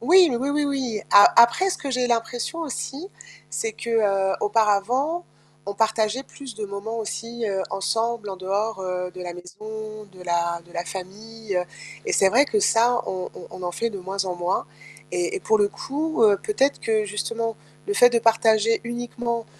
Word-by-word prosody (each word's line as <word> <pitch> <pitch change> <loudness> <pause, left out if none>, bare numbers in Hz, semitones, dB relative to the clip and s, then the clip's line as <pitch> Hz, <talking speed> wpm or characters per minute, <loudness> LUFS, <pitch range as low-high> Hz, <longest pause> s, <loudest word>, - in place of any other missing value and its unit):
Oui. 350 +8 +6
Oui, 270 +3 -1
oui, 295 +1 +1
oui. 265 -6 -1
A 205 - +8
après 370 +12 +5
ce - - -3
que 275 - -4
j'ai 250 -1 +1
l'impression 240 +7 -1
aussi, 300 +2 -5 0.4
c'est 450 -1 -3
qu'auparavant, 215 - +1 0.4
on 200 - -2
partageait 220 +3 +1
plus 270 -4 -10
de 210 0 -5
moments 200 +3 -5
aussi, 230 +1 -4
heu, 195 -1 -1
ensemble 225 +2 -1
en 190 - -5
dehors, 195 +2 -2
heu, 180 -1 -3
de 185 - -8
la 175 -1 -5
maison, 215 +4 -8
de 185 -1 -13
la 170 -1 0
de 175 - -18
la 170 0 -3
famille 200 +3 -5 0.5
et - - -2
c'est 195 - +5
vrai 255 +8 +5
que 425 +6 0
ça, 240 -6 +3
on 185 -1 -4
on - - -10
on 185 - -9
en 175 0 -3
fait 230 - -1
de 200 - -6
moins 190 +1 -2
en 180 - -2
moins 175 -1 -1 0.4
et 175 -1 -1
et - - -4
pour 220 - +3
le 205 - +3
coup 295 +2 -2 0.2
peut-être 285 -10 +1
que 220 -1 +1
justement 225 +2 -3 0.3
le 405 - -1
fait 245 -9 +7
de 235 - +3
partager 225 -1 +3
uniquement, 235 -1 -3
225 Hz, 180 wpm, -24 LUFS, 195-245 Hz, 0.5 s, A